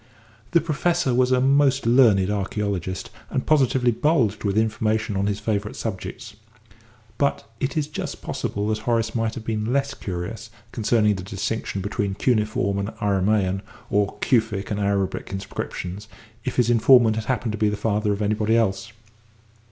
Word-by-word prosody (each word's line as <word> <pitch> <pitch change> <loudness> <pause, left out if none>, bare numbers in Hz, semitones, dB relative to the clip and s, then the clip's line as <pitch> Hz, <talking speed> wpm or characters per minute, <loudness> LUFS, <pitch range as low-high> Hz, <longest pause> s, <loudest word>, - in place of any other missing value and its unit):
The 170 - +3
Professor 165 -2 0
was 125 +1 +3
a 130 - +4
most 135 0 +3
learned 115 -6 +5
archæologist, 100 -2 -2 0.2
and 130 - -2
positively 130 -4 +3
bulged 120 -6 +1
with 100 -1 0
information 110 -1 0
on 100 +1 0
his 100 0 -1
favourite 105 -1 -2
subjects; 105 -1 -6 0.8
but 140 -5 0
it 135 +3 -2
is 150 - +1
just 150 - -5
possible 100 +1 -3
that 110 0 0
Horace 115 0 0
might 115 -1 -1
have 115 -3 -7
been 110 0 -2
less 140 +1 0
curious 100 +2 -6 0.2
concerning 110 -2 +2
the - - -5
distinction 100 +1 -3
between 100 0 -2
Cuneiform 110 -3 +1
and 100 +1 -2
Aramæan 100 -1 +1 0.3
or 100 -1 +1
Kufic 110 -4 +1
and 105 - -1
Arabic 100 -1 -1
inscriptions 95 +1 -5 0.4
if - - -3
his 120 -1 +3
informant 120 -1 +6
had 110 -1 -3
happened 120 -1 -1
to 110 - -4
be 105 - +3
the 105 - -2
father 105 0 0
of 100 +1 -1
anybody 105 +2 +2
else. 105 -1 0
110 Hz, 160 wpm, -23 LUFS, 100-120 Hz, 0.8 s, informant